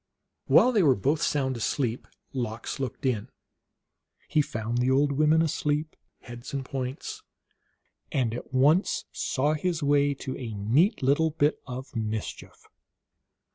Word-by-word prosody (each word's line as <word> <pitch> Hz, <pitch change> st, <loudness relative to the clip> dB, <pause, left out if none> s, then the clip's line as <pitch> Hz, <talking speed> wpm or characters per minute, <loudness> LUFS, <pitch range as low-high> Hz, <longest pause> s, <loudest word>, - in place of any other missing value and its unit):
While 255 Hz, -, +6 dB
they 220 Hz, -5 st, +3 dB
were 140 Hz, -7 st, +5 dB
both 145 Hz, +10 st, 0 dB
sound 135 Hz, -3 st, 0 dB
asleep 120 Hz, +1 st, -1 dB, 0.3 s
Lox 120 Hz, 0 st, -4 dB
looked 135 Hz, 0 st, -4 dB
in. 120 Hz, -6 st, 0 dB, 1.0 s
He 155 Hz, -, +3 dB
found 115 Hz, -3 st, -3 dB
the 125 Hz, +1 st, +2 dB
old 140 Hz, +2 st, +3 dB
women 155 Hz, +3 st, +3 dB
asleep, 150 Hz, 0 st, -1 dB, 0.3 s
heads 120 Hz, +3 st, -8 dB
and 135 Hz, -1 st, -3 dB
points, 135 Hz, -, -5 dB, 0.9 s
and 125 Hz, -7 st, 0 dB
at 120 Hz, -, -7 dB
once 145 Hz, +8 st, +3 dB
saw 145 Hz, +3 st, 0 dB
his 165 Hz, +1 st, -1 dB
way 145 Hz, 0 st, +3 dB
to 130 Hz, -1 st, -5 dB
a 115 Hz, -5 st, -5 dB
neat 135 Hz, -, +2 dB
little 145 Hz, +5 st, +3 dB
bit 150 Hz, -1 st, +1 dB
of 130 Hz, +1 st, -7 dB
mischief. 110 Hz, -1 st, -5 dB
135 Hz, 135 wpm, -27 LUFS, 125-150 Hz, 1.0 s, While